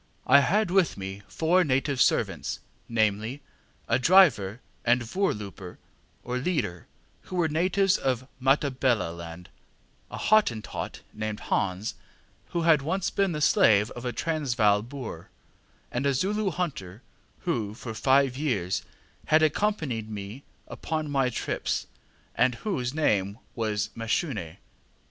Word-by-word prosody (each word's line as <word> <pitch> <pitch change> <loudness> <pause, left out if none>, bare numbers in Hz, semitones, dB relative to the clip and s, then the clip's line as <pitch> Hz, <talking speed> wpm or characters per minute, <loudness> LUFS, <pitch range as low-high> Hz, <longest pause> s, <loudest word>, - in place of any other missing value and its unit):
I 140 +2 +7
had 195 +6 +2
with 190 -3 +3
me 95 +1 -6
four 175 +3 +2
native 135 -2 +1
servants, - - +1 0.3
namely, 110 +4 0 0.4
a - - +2
driver 130 - +5 0.2
and 120 +1 +3
voorlooper, 105 - -3 0.5
or 125 +1 -2
leader, 120 - -2 0.4
who 185 - -7
were 175 -2 +2
natives 185 +5 +2
of 130 -1 -1
Matabeleland, 120 - 0 0.6
a - - -7
Hottentot 205 - +1
named 110 -1 -4
Hans, 95 +3 -1 0.5
who 170 - -2
had 160 -3 +5
once 175 +6 -1
been 195 -2 +1
the 150 - -3
slave 105 -6 +4
of 120 - -8
a 125 - -1
Transvaal 120 -8 +1
Boer, 120 -8 -8 0.6
and 135 +3 0
a 140 - +2
Zulu 200 +7 0
hunter, 130 - -4 0.4
who 110 - -2
for 115 -1 -7
five 135 +2 +3
years 115 - -1 0.4
had 155 +1 +5
accompanied 155 - 0
me 105 +4 -7 0.3
upon 155 -2 -4
my 135 -2 +2
trips, 120 - -2 0.5
and 125 -1 +2
whose 125 - -2
name 105 -9 +1 0.2
was 105 -2 -2
Mashune. 115 - -2
130 Hz, 125 wpm, -27 LUFS, 105-160 Hz, 0.6 s, I